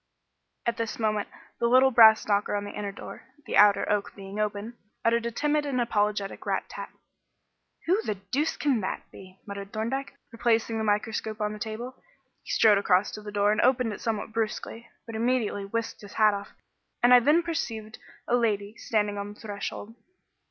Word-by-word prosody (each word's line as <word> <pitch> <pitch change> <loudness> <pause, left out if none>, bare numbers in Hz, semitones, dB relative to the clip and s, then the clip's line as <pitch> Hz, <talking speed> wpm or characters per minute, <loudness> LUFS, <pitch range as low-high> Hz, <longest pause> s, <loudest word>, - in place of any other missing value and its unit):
At 235 -1 0
this 230 -1 -3
moment 215 -2 -1 0.3
the 235 - +2
little 260 +2 +5
brass 220 -2 +7
knocker 205 0 +1
on 205 - -1
the 205 - -6
inner 205 -1 -4
door 200 - -10 0.2
the - - -3
outer 205 -1 +6
oak 205 -1 -1
being 195 +1 -8
open 210 +2 -2 0.3
uttered 230 0 +2
a - - -3
timid 295 +4 +1
and 275 -3 -1
apologetic 210 -4 -1
rat - - -1
tat. - - -7 1.0
"Who 375 +6 +2
the 215 - -2
deuce 250 +11 -2
can 270 -7 +1
that 190 - -3
be?" 185 0 -14
muttered 200 -1 -7
Thorndyke, 250 +6 -3 0.2
replacing 230 -1 +1
the - - -1
microscope 215 +1 -1
on 210 0 -1
the 210 - -8
table. 230 +4 -6 0.4
He - - -15
strode 210 -3 +5
across 190 0 +2
to 215 - -8
the 210 0 -8
door 205 0 +2
and 210 - +1
opened 250 -3 +2
it - - -9
somewhat 220 -1 -3
brusquely, 225 +1 -3 0.2
but 230 - -8
immediately 225 -3 0
whisked 230 +3 -4
his 205 - -11
hat 215 -1 +4
off, 200 0 -6 0.5
and 245 +1 +7
I 250 - +10
then 300 +7 +3
perceived 225 -10 -4 0.3
a 245 - +3
lady 210 -3 0
standing 210 -2 -1
on 205 +1 -6
the - - -21
threshold. 205 +1 -6
220 Hz, 185 wpm, -27 LUFS, 205-235 Hz, 1.0 s, I